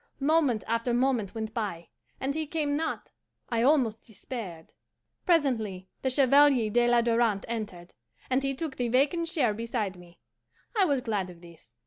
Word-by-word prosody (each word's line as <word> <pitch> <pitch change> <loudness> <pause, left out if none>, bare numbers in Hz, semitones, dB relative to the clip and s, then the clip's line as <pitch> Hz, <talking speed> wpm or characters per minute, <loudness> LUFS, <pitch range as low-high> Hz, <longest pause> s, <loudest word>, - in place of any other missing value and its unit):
Moment 280 - +2
after 230 +1 0
moment 245 -5 0
went 220 -1 -4
by, 200 -8 -4 0.3
and 270 +1 -1
he 315 0 -3
came 295 -2 -1
not. 320 +2 -3 0.4
I 230 -3 0
almost 245 -5 +2
despaired. 200 -6 -8 0.5
Presently 225 - +1
the 260 - 0
Chevalier 270 -3 +4
de 240 +2 +3
la 240 0 +4
Darante 230 -3 +1
entered, 210 -7 -6 0.3
and 260 +1 +1
he 275 0 -1
took 295 -1 -5
the 245 - 0
vacant 290 +7 +2
chair 280 -10 +1
beside 225 -3 -3
me. 175 -1 -16 0.6
I 405 -3 +4
was 280 -6 +1
glad 210 -6 -2
of 170 -1 -13
this. 165 -9 -16
240 Hz, 160 wpm, -28 LUFS, 210-275 Hz, 0.6 s, Chevalier